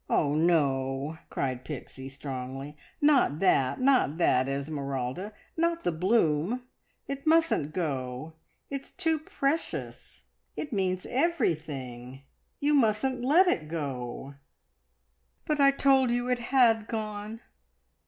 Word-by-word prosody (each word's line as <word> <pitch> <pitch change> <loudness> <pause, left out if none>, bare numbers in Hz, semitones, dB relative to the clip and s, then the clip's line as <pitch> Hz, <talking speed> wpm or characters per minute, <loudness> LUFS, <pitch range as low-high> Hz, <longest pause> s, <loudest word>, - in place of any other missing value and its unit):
"Oh, 145 -2 +2
no!" 145 -2 +1
cried 130 -2 -2
Pixie 135 -1 -7
strongly. 135 0 -6 0.3
"Not 285 - +4
that, 140 -7 +2
not 255 - +3
that, 130 -6 +3
Esmeralda. 140 +4 -3 0.2
Not 335 0 0
the 175 - +1
bloom. 180 +4 +1 0.4
It 275 +2 -5
mustn't 325 - +3
go; 140 -3 -3 0.4
it's 275 -1 -5
too 325 -4 0
precious. 300 +1 -3 0.3
It 295 -4 -5
means 185 -2 -1
everything. 140 - -2 0.4
You 290 +1 +2
mustn't 250 0 +2
let 315 +9 +5
it 160 - 0
go!" 135 -4 -5 1.1
"But 300 -1 0
I 275 -1 +7
told 270 -2 +3
you 245 +1 0
it 250 -1 +1
had 230 -5 +4
gone. 215 0 -5
175 Hz, 115 wpm, -28 LUFS, -, 1.1 s, I